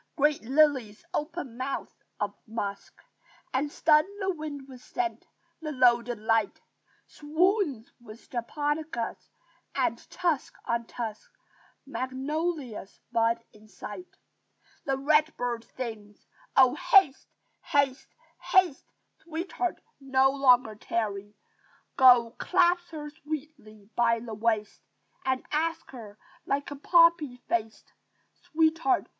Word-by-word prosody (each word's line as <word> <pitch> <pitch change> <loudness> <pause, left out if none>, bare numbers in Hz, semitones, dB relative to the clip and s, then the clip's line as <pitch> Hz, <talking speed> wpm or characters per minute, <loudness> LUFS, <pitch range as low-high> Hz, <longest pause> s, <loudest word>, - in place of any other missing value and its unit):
Great 295 -2 +2
lilies 260 -5 +2
open 300 -6 -4
mouths 265 +1 -3 0.3
of - - -1
musk 205 -3 -5 0.6
And 285 +3 0
stun 305 0 +5 0.2
the 385 -1 0
wind 305 -3 -6
with 255 -2 -12
scent; 355 +4 -3 0.3
the 305 -1 -4
loaded 240 -3 +3
light 220 -1 +1 0.5
Swoons 310 - 0
with 225 -1 -13
japonicas; 290 +1 -3 0.5
and, - - 0
tusk 340 -6 -1
on 235 0 -1
tusk, 220 -3 -6 0.6
Magnolias 270 - -3
bud 230 0 +1
in 215 0 -18
sight. 210 - -10 0.7
The 270 -1 0
red 305 +3 +2
bird 240 -2 -2
sings, 215 -5 -8 0.3
"Oh, 260 -2 +7
haste, 370 - +4 0.3
haste, 280 -1 +1 0.3
haste! 365 -7 +2 0.3
Sweetheart! 340 +2 -3 0.2
no 270 -1 +3
longer 250 -5 +4
tarry! 205 -1 -3 0.6
Go, 245 -3 +7
clasp 350 -1 +2
her 295 -2 -7
sweetly 290 -9 -8
by 230 -1 +3
the 225 -1 -7
waist! 215 -1 -1 0.4
And 260 -1 0
ask 325 +2 -1
her, 220 -5 -10 0.3
like 280 +1 -1
a - - -4
poppy 335 -3 +4
faced, 225 -1 -3 0.4
Sweetheart! 325 +4 +1
270 Hz, 110 wpm, -28 LUFS, 230-310 Hz, 0.7 s, Oh